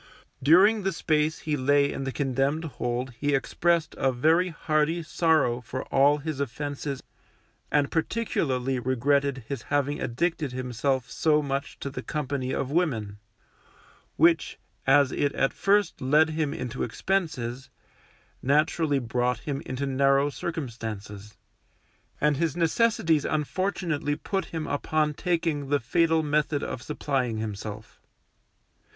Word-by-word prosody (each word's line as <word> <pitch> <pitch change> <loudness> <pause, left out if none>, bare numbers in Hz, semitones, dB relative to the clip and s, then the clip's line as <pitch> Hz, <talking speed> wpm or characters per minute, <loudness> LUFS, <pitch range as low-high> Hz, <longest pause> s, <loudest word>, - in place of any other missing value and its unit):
During 190 +10 +6
the 195 0 0
space 155 -1 0
he 155 -1 +1
lay 140 +1 +3
in 135 - -4
the 135 - -2
condemned 135 +3 0
hold 125 -3 -3
he 145 -1 +1
expressed 165 +3 +1
a 135 - +2
very 160 +8 +3
hearty 160 0 0
sorrow 155 -7 +2
for 130 +1 -5
all 140 +2 +5
his 150 -1 -5
offences 140 +1 -4 0.7
and 145 -1 +2
particularly 135 - -1
regretted 135 +2 +1
his 140 -4 -4
having 145 +2 -1
addicted 150 +2 -1
himself 130 +1 -1
so 150 -1 +2
much 140 0 -3
to 140 - -4
the - - -5
company 140 -4 -3
of 135 0 -2
women, 115 - -1 1.0
which, 165 +1 +3 0.3
as 135 -1 +5
it 140 -1 0
at 135 - +1
first 200 -2 +1
led 150 +5 +4
him 155 -2 -1
into 130 -4 -5
expenses, 150 -10 -2 0.7
naturally 150 +1 +2
brought 125 -1 -1
him 140 -1 -3
into 130 +2 -3
narrow 140 +1 +2
circumstances; 110 - -6 0.8
and 150 -1 +2
his 165 0 -1
necessities 165 -3 +2
unfortunately 155 -1 -1
put 195 +5 -2
him 160 -2 -5
upon 150 +1 0
taking 165 -4 -1
the 145 0 +2
fatal 160 +5 +2
method 150 -1 0
of 125 - -4
supplying 130 -6 -2
himself. 110 0 -6
145 Hz, 130 wpm, -26 LUFS, 130-160 Hz, 1.0 s, During